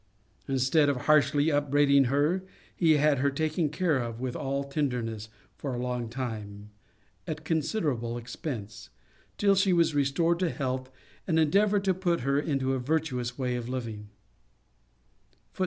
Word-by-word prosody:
Instead 135 +3 +3
of 130 -3 -1
harshly 150 0 +4
upbraiding 145 -1 +3
her, 145 +8 +1 0.3
he 165 -3 +4
had 145 -2 +3
her 140 +2 +2
taken 155 +2 -1
care 155 -2 +1
of 115 -2 -4
with 125 -1 -3
all 140 +1 -2
tenderness 125 -7 -3 0.3
for 135 -3 -4
a - - -4
long 125 -2 -3
time, 105 -4 -6 0.6
at 155 -1 -5
considerable 145 - -1
expence, 115 -4 -7 0.5
till 200 -1 +4
she 195 0 +3
was 165 -2 +3
restored 155 +5 +1
to 180 -2 +1
health, 130 -3 -3 0.4
and 165 -3 +1
endeavoured 200 +6 +3
to 190 -1 +2
put 175 -3 0
her 140 +2 +1
into 135 -3 0
a 130 - -1
virtuous 125 -3 -2
way 125 -2 -1
of 120 0 -4
living. 115 -5 -5
140 Hz, 145 wpm, -28 LUFS, 125-160 Hz, 0.6 s, harshly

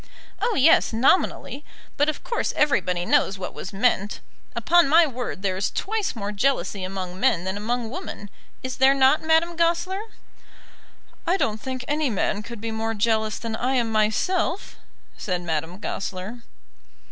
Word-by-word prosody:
"Oh, 470 - +1
yes; 275 -3 +5
nominally. 275 +3 +1 0.3
But 290 +2 +2
of 310 - -4
course 470 - -1
everybody 180 -12 +1
knows 195 - +2
what 190 - -6
was - - -7
meant. 205 -1 +1 0.4
Upon 345 -3 +4
my 330 +3 +7
word 245 -8 -5
there 190 -2 0
is 190 - 0
twice 430 -4 -2
more 205 -2 -4
jealousy 210 -3 0
among 185 -1 -5
men 170 -2 +2
than 190 +1 -3
among 230 +2 -2
women. 250 - -7 0.3
Is 255 -1 -4
there 265 +1 +5
not, 270 +2 +4
Madame 320 +2 +2
Goesler?" 340 +4 +1 1.3
"I 360 +3 +3
don't 215 - -1
think 260 -1 -5
any 295 -1 0
man 205 -1 -1
could 230 +1 -9
be 225 +1 -4
more 225 0 -2
jealous 220 0 +1
than 230 -1 -4
I 255 +4 0
am 235 -3 +1
myself," 330 - 0 0.4
said 180 -3 -2
Madame 160 +1 -3
Goesler. 195 +3 -5
235 Hz, 160 wpm, -24 LUFS, 200-300 Hz, 1.3 s, my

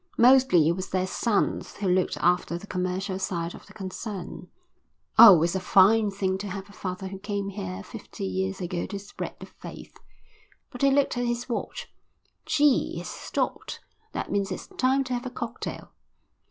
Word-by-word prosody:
Mostly 245 - +6
it - - +4
was 185 +2 -4
their 185 0 0
sons 205 +2 -1
who 200 - -3
looked 185 0 +1
after 175 -1 +1
the 175 - -10
commercial 185 0 -2
side 170 -3 -2
of - - -13
the - - -15
concern. 195 0 -6 0.7
Oh, 200 -8 +10
it's 170 - +1
a 190 - 0
fine 205 +4 +5
thing 190 -1 -1
to 205 - -5
have 195 0 -6
a 200 - -16
father 185 0 -5
who 195 0 -8
came 200 0 -3
here 95 - -6
fifty - - -8
years 95 0 -2
ago 175 -1 -3
to 200 - -5
spread 200 0 -7
the - - -8
faith." - - -11 0.8
But 250 - -9
he 275 - +5
looked 275 -2 +2
at 245 - 0
his 240 +1 -2
watch. 485 - -5 0.5
"Gee, 295 -3 +3
it's - - -6
stopped. - - -3 0.3
That - - -4
means 200 -1 0
it's 185 - -5
time 270 -7 +1
to 255 -1 -4
have 245 +1 -3
a - - -4
cocktail." 235 -1 -6
195 Hz, 180 wpm, -26 LUFS, 185-235 Hz, 0.8 s, Oh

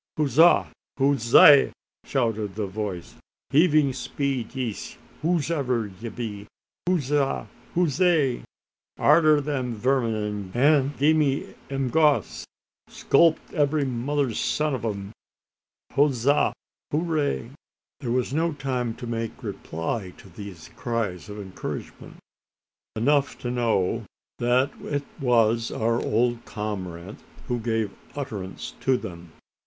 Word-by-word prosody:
"Hooza! 155 +3 +5 0.3
hoozay!" 135 +1 +6 0.3
shouted 110 -7 -1
the 105 -1 -2
voice. 95 -3 -5 0.3
"Heaving 150 -3 +4
speed 130 0 -3
yees, 125 -5 -4 0.2
whos'ever 140 - 0
ye 115 - -4
be! 105 -2 -6 0.4
Hooza! 145 -5 0 0.3
hoozay! 165 -5 +2 0.6
Arter 155 0 +5
the 145 -2 -2
verming, 110 -5 -1
an' 140 +2 +3
gie 145 -1 +2 0.2
'em 135 -2 -1
goss! 150 -3 +2 0.4
Sculp 160 +3 +4 0.2
every 150 -2 +2
mother's 130 0 -1
son 150 -1 0
o' 115 - 0
'em. 100 -1 -6 0.8
Hooza! 140 -1 +3 0.4
hoozay!" 150 -6 -1 0.5
There 125 - -5
was 125 +1 0
no 165 +2 +1
time 125 -5 -2
to - - -8
make 115 +1 -4
reply 95 -1 -4
to 95 - -15
these 95 -3 -10
cries 110 -6 -3
of 105 - -7
encouragement. 95 -2 -7 0.8
Enough 140 +5 +2
to 120 - -4
know 115 -7 0 0.3
that 125 +3 +2
it 145 -1 -2 0.2
was 115 -3 +2
our 115 +1 0
old 120 +2 +1
comrade 95 -3 -5 0.3
who 120 -1 -1
gave 110 -2 -1 0.2
utterance 110 -10 -6
to 130 -1 +3
them. 85 -5 -9
125 Hz, 110 wpm, -25 LUFS, 110-145 Hz, 0.8 s, hoozay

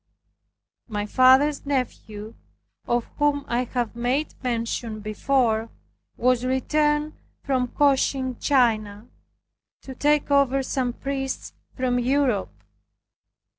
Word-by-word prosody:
My 205 -3 -3
father's 260 +6 +4
nephew, 230 -6 -4 0.5
of 240 -1 +1
whom 290 -1 +1
I 240 +2 0
have 240 -2 -3
made 250 +6 -1
mention 230 -2 -2
before, 225 +1 0 0.5
was 250 0 +2
returned 295 +4 +1 0.3
from 255 -2 0
Cochin 265 -2 +1
China, 220 -5 +1 0.8
to 265 - -8
take 290 +2 +1
over 275 -1 +3
some 255 -1 -1
priests 270 0 -4 0.2
from 250 -1 +1
Europe. 255 -3 0
255 Hz, 95 wpm, -24 LUFS, 235-275 Hz, 0.8 s, father's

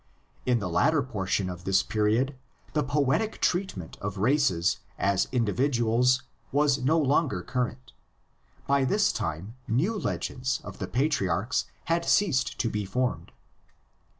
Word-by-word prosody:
V 125 - +1
In - - +4
the 100 -5 -3
later 140 - +2
portion 100 -5 -1
of 90 -1 -6
this 95 0 +3
period 115 +5 +1 0.4
the 150 - +2
poetic 145 - 0
treatment 175 - -1
of 105 0 -4
races 110 - +2 0.2
as 100 -1 +1
individuals 125 +1 +2 0.3
was 145 -1 +3
no 150 +6 +2
longer 140 - +1
current: 125 0 -3 0.7
by 140 -1 +2
this 130 - +2
time 85 +9 -4
new 155 - +1
legends 130 -10 -2
of 100 - -9
the - - -3
patriarchs 120 - 0 0.2
had 170 +1 +1
ceased 165 -12 +2
to 115 - +1
be 105 -2 -2
formed. 125 +6 -2
125 Hz, 135 wpm, -27 LUFS, 105-140 Hz, 0.7 s, In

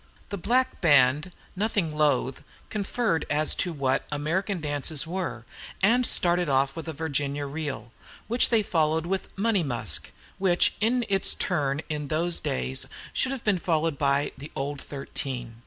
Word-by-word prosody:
The 200 - -3
black 255 +7 +1
band, 145 +1 +4 0.2
nothing 195 -6 0
loath, 140 -4 +1 0.3
conferred 210 -3 0
as 150 +1 +2
to 180 - -1
what 135 -4 0
"American 175 +7 -1
dances" 150 0 0
were, 180 +1 -4 0.4
and 240 +5 +4
started 175 -2 +2
off 135 0 +2
with 165 - -6
"Virginia 145 -2 -2
Reel," 140 -6 -5 0.4
which 240 +2 +3
they 225 -2 +3
followed 160 -3 +1
with 190 +1 -2
"Money 210 -1 +2
Musk," 115 - -1 0.3
which, 185 -2 +3
in 240 +2 +2
its 195 -1 +1
turn 145 -5 0
in 150 -2 -3
those 165 +4 +1
days, 65 +1 -1 0.3
should 265 - +1
have 270 -3 -4
been 200 -4 +2
followed 160 -3 0
by 140 0 +2
"The 145 +3 -9
Old 140 +1 -3
Thirteen." 130 -4 -5
155 Hz, 150 wpm, -27 LUFS, 140-190 Hz, 0.4 s, band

